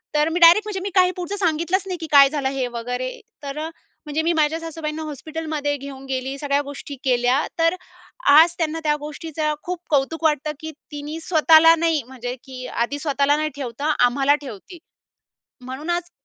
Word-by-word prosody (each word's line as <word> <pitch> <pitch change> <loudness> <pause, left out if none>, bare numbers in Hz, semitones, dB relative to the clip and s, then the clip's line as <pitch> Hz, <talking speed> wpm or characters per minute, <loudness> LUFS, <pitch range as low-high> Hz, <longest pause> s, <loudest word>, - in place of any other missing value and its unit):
तर 300 +1 +3
मी 335 +2 -1
डायरेक्ट 350 +5 +7
म्हणजे 405 -2 -3
मी 400 - -2
काही 365 0 +5
पुढचं 360 +3 -4
सांगितलंच 340 +2 0
नाही 365 -2 -3
की 320 - -4
काय 280 -1 +8
झालं 275 -2 -1
हे 270 -2 -2
वगैरे. 250 +2 -4 0.2
तर 280 +1 -5
अ, 320 +1 -3 0.4
म्हणजे 300 +1 -1
मी 335 - +1
माझ्या 315 +1 +1
सासूबाईंना 320 -1 -5
हॉस्पिटलमध्ये 310 0 -3
घेऊन 275 -1 -9
गेली, 265 +1 -3
सगळ्या 285 0 +1
गोष्टी 285 0 -8
केल्या. 250 +2 +2
तर 330 +2 +3 0.5
आज 320 +4 +7
त्यांना 320 0 -1
त्या 300 0 +3
गोष्टीचं 305 +1 -3
खूप 360 0 -4
कौतुक 305 +3 0
वाटतं 305 -1 +1
की 315 0 -6 0.2
"तिने 295 +2 -6
स्वतःला 325 0 +6
नाही 325 -3 0
म्हणजे 250 -1 -6
की 255 -2 -9
आधी 260 +5 -2
स्वतःला 285 -1 +1
नाही 310 0 -1
ठेवता 280 +1 -4 0.2
आम्हाला 275 +3 +2
ठेवती. 275 - -10 0.8
म्हणून 260 +6 -6
आज 350 0 -2
300 Hz, 175 wpm, -22 LUFS, 275-325 Hz, 0.8 s, काय